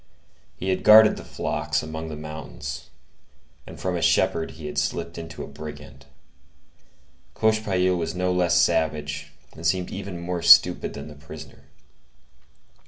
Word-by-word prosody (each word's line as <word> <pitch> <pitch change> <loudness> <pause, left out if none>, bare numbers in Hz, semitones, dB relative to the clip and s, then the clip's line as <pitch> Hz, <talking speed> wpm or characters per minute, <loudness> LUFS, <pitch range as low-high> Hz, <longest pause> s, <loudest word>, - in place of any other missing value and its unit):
He 95 - -3
had 95 - 0
guarded 110 0 +8
the - - -9
flocks - - -2
among 80 +1 -6
the 75 - -6
mountains, 75 -2 -7 0.8
and - - -11
from 90 -1 -2
a 85 - -2
shepherd 80 0 +2
he 80 - -9
had 75 -1 -2
slipped 85 +4 -3
into 80 -1 -8
a - - -8
brigand. 70 -2 -10 1.3
Cochepaille 100 -4 +1
was 85 -1 -3
no 90 0 0
less 90 -1 +3
savage 80 -4 0 0.2
and 80 - -11
seemed 90 +2 0
even 95 -3 -6
more 85 0 -3
stupid 85 +1 +6
than 70 +1 -7
the 75 - -10
prisoner. 75 -1 -12
80 Hz, 145 wpm, -24 LUFS, 75-90 Hz, 1.3 s, guarded